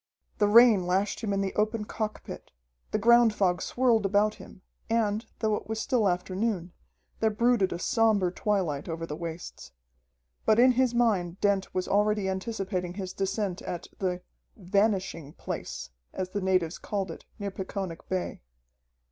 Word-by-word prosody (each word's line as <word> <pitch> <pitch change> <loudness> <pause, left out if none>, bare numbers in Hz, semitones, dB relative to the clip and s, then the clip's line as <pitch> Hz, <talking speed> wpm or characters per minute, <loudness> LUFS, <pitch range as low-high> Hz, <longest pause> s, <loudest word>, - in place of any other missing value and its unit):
The 205 - +4
rain 215 -4 +6
lashed 190 +3 0
him 215 -3 -2
in 200 0 +1
the 195 -1 -2
open 215 0 0
cockpit, 215 0 -5 0.4
the - - 0
ground 235 0 +5
fog 180 -3 +1
swirled 240 -4 +2
about 205 +2 +2
him, 185 - -14 0.3
and, 220 -1 0
though 220 -2 0
it - - -3
was 220 0 -3
still 220 -3 +2
afternoon, 185 0 -2 0.5
there 220 - +3
brooded 220 -2 +2
a - - -2
somber 210 -2 +2
twilight 180 -8 -1
over 165 0 -3
the 150 - -5
wastes. 165 - -7 0.7
But 215 - +4
in 255 +2 +7
his 250 -1 +1
mind 195 -7 +1
Dent 200 -2 +1
was 185 - -1
already 210 0 +2
anticipating 190 -2 -3
his 190 -2 -5
descent 195 -1 -2
at 175 -1 -6
the 180 -2 -2 0.3
"Vanishing 190 -6 0
Place," - - -6 0.2
as 185 -1 -3
the 205 - -2
natives 185 -3 +1
called 195 -4 -3
it - - -11
near 200 -1 -4
Peconic 190 -2 -6
Bay. 185 -1 -3
200 Hz, 155 wpm, -28 LUFS, 185-220 Hz, 0.7 s, in